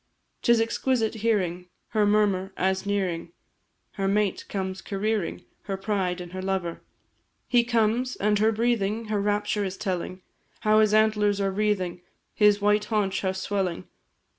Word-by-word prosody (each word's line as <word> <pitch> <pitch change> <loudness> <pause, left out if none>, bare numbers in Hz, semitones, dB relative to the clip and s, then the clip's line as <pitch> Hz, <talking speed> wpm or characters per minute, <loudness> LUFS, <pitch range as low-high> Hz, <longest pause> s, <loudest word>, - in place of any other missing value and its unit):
'Tis 235 -1 +4
exquisite 225 0 0
hearing 180 -6 0 0.2
Her 215 -3 +2
murmur, 205 -2 +2
as, 190 +1 0
nearing, 180 -5 -1 0.6
Her 195 -1 -2
mate 200 -1 0
comes 190 -1 -3
careering, 205 -1 -2 0.2
Her 195 -1 -3
pride, 190 -3 -1
and 175 -1 -8
her 185 0 -5
lover; 190 -3 -2 0.7
He 240 -1 +4
comes 235 +2 +1
and 210 0 +1
her 220 +1 +4
breathing 225 -1 0
Her 210 -2 0
rapture 205 0 0
is 190 -1 -4
telling; 185 -2 -3 0.4
How 215 0 +4
his 215 -1 +4
antlers 210 -2 +3
are 195 -1 +1
wreathing, 190 -3 -1 0.3
His 210 -1 +4
white 210 +1 +2
haunch, 205 -3 0
how 190 -1 0
swelling! 190 -2 -2
205 Hz, 145 wpm, -26 LUFS, 190-215 Hz, 0.7 s, Tis